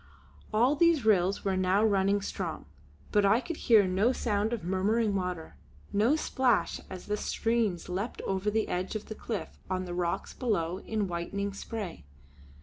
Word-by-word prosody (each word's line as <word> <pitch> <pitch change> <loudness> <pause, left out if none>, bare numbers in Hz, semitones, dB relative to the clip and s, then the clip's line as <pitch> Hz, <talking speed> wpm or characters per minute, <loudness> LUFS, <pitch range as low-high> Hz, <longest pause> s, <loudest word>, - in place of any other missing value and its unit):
All 240 +7 +3
these 330 -5 +3
rills 195 -2 +3
were 195 -1 +1
now 185 +2 +2
running 200 -1 +2
strong, 180 -5 -4 0.5
but 205 - +4
I 200 +4 +5
could 325 +4 -5
hear 220 -4 +5
no 190 +6 +2
sound 215 -4 0
of 235 -3 -3
murmuring 200 +4 +1
water, 180 -4 -3 0.4
no 220 +8 +4
splash 260 -7 +1
as 185 -1 -8
the 210 0 -1
streams 225 -6 0
leapt 195 +6 -3
over 195 +2 -1
the 220 +1 0
edge 185 +4 -2
of 215 - -5
the - - -3
cliff 215 -1 -5
on 185 0 -1
the 175 - -5
rocks 175 -1 -2
below 190 -8 -1
in 215 -2 -2
whitening 195 +3 -3
spray. 200 - -6
200 Hz, 165 wpm, -29 LUFS, 185-225 Hz, 0.5 s, I